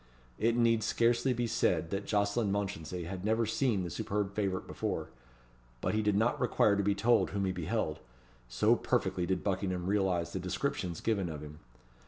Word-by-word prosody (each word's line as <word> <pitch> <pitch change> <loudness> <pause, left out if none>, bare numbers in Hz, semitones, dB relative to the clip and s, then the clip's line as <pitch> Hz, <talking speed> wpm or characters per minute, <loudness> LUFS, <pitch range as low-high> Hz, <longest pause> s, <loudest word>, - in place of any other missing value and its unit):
It 115 +2 +2
need 115 -1 +3
scarcely 120 +4 +2
be 120 -1 0
said 85 -6 +1
that 100 +1 -3
Jocelyn 105 +1 +1
Mounchensey 90 -4 -3
had 90 +2 -6
never 110 +2 +2
seen 110 -3 +1
the 85 - -5
superb 100 +4 -2
favourite 95 -3 -1
before; - - -3 0.7
but - - -1
he 110 - +2
did 105 -1 +1
not 120 +7 +1
require 110 -4 +3
to 100 - +1
be 100 0 +1
told 115 +4 +3
whom 100 0 -1
he 95 - 0
beheld, 90 -2 -2 0.5
so - - +3
perfectly 90 -1 0
did 95 - -1
Buckingham 95 -2 -1
realize 95 -4 0
the - - -2
descriptions 85 -3 -2
given 100 -6 0
of 75 -2 -6
him. 75 0 -10
100 Hz, 180 wpm, -32 LUFS, 90-110 Hz, 0.7 s, need